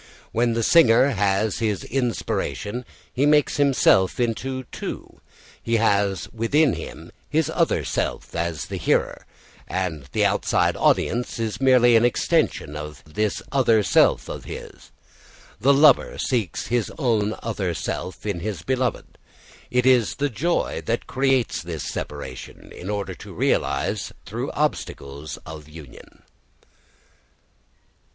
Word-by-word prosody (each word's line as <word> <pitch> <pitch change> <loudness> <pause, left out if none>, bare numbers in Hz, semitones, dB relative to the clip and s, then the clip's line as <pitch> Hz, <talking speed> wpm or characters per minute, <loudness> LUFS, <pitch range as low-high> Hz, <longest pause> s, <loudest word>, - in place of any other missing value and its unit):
When 120 +1 +1
the 115 0 0
singer 135 -3 +6
has 100 -2 0
his 105 -4 -1
inspiration 125 -2 -2 0.3
he 140 +3 +2
makes 150 0 +3
himself 130 -10 +3
into 130 +2 -1
two; - - -7 0.4
he 115 - 0
has 100 -3 +1
within 130 +5 +2
him - - -8 0.2
his - - +1
other - - +1
self - - -3
as 85 -4 -2
the - - -5
hearer, - - 0 0.4
and 85 -7 -3
the - - +2
outside - - +1
audience 120 +2 +1
is 115 0 -3
merely 125 -3 +5
an 115 - +5
extension 115 -9 +1
of 75 -3 -7
this 100 +8 -2
other 115 -6 +3
self - - +3
of - - -7
his. - - -9 0.7
The 130 +7 +4
lover 145 +2 +5
seeks 115 - -1
his 120 -2 -1
own 110 -6 +1
other 100 -6 -2
self 95 - -5
in 100 -5 -2
his 95 -3 -4
beloved. 130 -3 -2 0.5
It 125 0 +1
is 125 -4 +4
the 145 -1 -1
joy 170 +10 -1
that 115 +1 -1
creates 130 - +1
this 85 -2 -5
separation, 70 -4 -7
in 90 - -8
order 100 -2 -3
to - - -11
realise - - 0
through - - -4
obstacles 70 +2 -3
of 75 -1 -9
union. 75 -5 -14
115 Hz, 130 wpm, -23 LUFS, 95-125 Hz, 0.7 s, singer